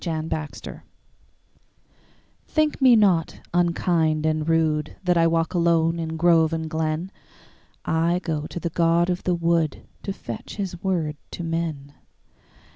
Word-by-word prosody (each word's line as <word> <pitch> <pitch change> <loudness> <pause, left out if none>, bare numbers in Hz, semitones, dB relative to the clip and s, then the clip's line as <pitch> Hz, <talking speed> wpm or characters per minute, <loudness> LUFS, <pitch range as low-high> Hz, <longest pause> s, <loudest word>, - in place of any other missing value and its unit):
The 165 -3 -2
Apology 155 -1 -5 1.7
THINK 310 -2 0
me 255 -2 +7
not 190 -7 +2
unkind 170 -3 +1
and 155 0 0
rudeThat 165 +2 +1
I 165 -1 +4
walk 165 0 0
alone 170 -1 +2
in 160 0 -3
grove 165 -1 +4
and 160 -1 -2
glen;I 160 +1 -3
go 155 -3 -2
to - - -6
the 170 -1 -3
god 170 +2 +2
of 180 - -2
the 180 - +2
woodTo 170 +3 -1
fetch 120 - -7
his 185 -4 -5
word 165 -6 -1
to 175 - -6
men. 165 -4 -3
165 Hz, 125 wpm, -24 LUFS, 160-175 Hz, 1.7 s, me